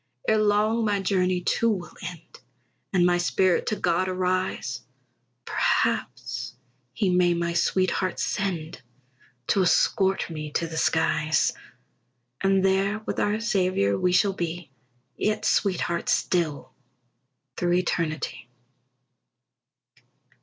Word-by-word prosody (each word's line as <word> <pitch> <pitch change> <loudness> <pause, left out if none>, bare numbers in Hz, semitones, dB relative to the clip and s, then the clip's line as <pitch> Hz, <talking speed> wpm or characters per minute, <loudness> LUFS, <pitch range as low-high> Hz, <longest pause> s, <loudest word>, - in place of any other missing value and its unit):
Ere 220 0 +3
long 215 +2 +2
my 205 -2 +1
journey, 185 -2 +1
too, 230 +5 +1
will 185 -5 -3
end, 175 -3 -9 0.5
And 180 -2 +3
my 175 0 +3
spirit 180 +1 +1
to 215 - 0
God 185 -1 0
arise; 185 -8 -1 0.6
Perhaps - - -1 0.4
he 185 +8 0
may 180 -1 +3
my 170 0 -1
sweetheart 185 +2 0
send 170 -5 -3 0.7
To 195 - +3
escort 190 +2 +2
me 155 -2 -6
to 170 - 0
the 165 0 -7
skies; 155 -1 +1 0.9
And 195 -1 +3
there 195 +2 +2
with - - -3
our 205 +1 +1
Saviour 185 - +1
we 180 - +1
shall 195 +2 +3
be, 170 -4 -5 0.5
Yet 215 0 -1
sweethearts 175 -4 0
still 150 -7 -1 0.8
through 175 0 0
eternity. 165 -6 -2
180 Hz, 110 wpm, -25 LUFS, 170-195 Hz, 0.9 s, Ere